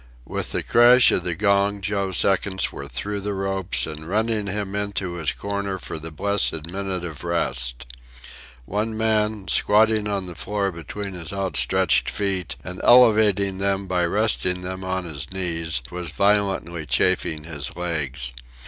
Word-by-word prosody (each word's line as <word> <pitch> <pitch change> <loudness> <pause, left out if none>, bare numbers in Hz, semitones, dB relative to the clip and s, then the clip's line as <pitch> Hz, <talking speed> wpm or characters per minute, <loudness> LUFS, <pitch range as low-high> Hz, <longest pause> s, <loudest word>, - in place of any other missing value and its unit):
With - - -4
the - - -1
crash 120 +1 +6
of 90 - +1
the 85 -1 -1
gong 100 +1 +2
Joe's 100 -2 -1
seconds 95 -1 +1
were 70 - -7
through 100 +11 -2
the 100 0 -3
ropes 95 -1 0
and 80 +1 -8
running 110 0 0
him 100 0 -3
into 100 -3 -2
his 85 -3 -1
corner 100 -1 -3
for 80 - -6
the 80 +1 -7
blessed 80 -1 0
minute 95 0 -4
of 80 -3 -7
rest. 65 -7 -2 0.8
One 110 - -2
man, 110 -2 +1
squatting 110 0 +3
on 100 -2 -2
the 90 - -7
floor 100 +3 -2
between 95 +4 -6
his 85 -3 -5
outstretched 95 -11 +2
feet 95 -5 -2
and 90 +2 -7
elevating 105 -5 +5
them 100 0 0
by 90 -1 0
resting 90 -2 +1
them 95 +1 -5
on 95 0 -2
his 75 -2 -6
knees, 85 -7 -2
was 90 -1 -4
violently 95 -3 0
chafing 75 -1 +1
his 75 -3 -4
legs. 75 -7 -3
95 Hz, 155 wpm, -23 LUFS, 85-100 Hz, 0.8 s, crash